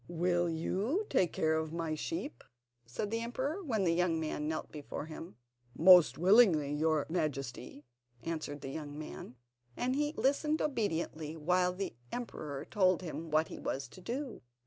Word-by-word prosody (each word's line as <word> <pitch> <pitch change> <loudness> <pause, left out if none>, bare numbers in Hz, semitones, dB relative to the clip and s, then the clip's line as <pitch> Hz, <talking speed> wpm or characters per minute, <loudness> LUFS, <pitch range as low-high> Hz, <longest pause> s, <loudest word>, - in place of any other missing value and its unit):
"Will 175 0 +1
you 200 - -1
take 185 -10 +3
care 160 0 +1
of 160 0 -1
my 165 -1 -2
sheep?" 305 - -4 0.4
said 200 - -3
the 230 - 0
emperor, 265 +9 -2
when 225 - 0
the 170 -2 +3
young 170 -1 +2
man 155 -1 -2
knelt 155 0 -3
before 150 -1 -6
him. 160 -4 -9 0.4
"Most 180 +1 +7
willingly, 175 -6 +5
your 155 0 +2
Majesty," 140 -4 -3 0.4
answered 155 -3 -4
the 135 - -5
young 145 -1 -6
man, 150 -4 -8 0.4
and 255 +1 0
he 295 +1 0
listened 300 +3 +2
obediently 165 - -2
while 180 +3 +2
the 190 +2 -4 0.2
emperor 150 - -5
told 185 -4 +2
him 165 -1 -5
what 155 +1 +2
he - - -7
was 135 - -3
to 185 - -13
do. 255 +5 -4
170 Hz, 160 wpm, -33 LUFS, 155-215 Hz, 0.4 s, Most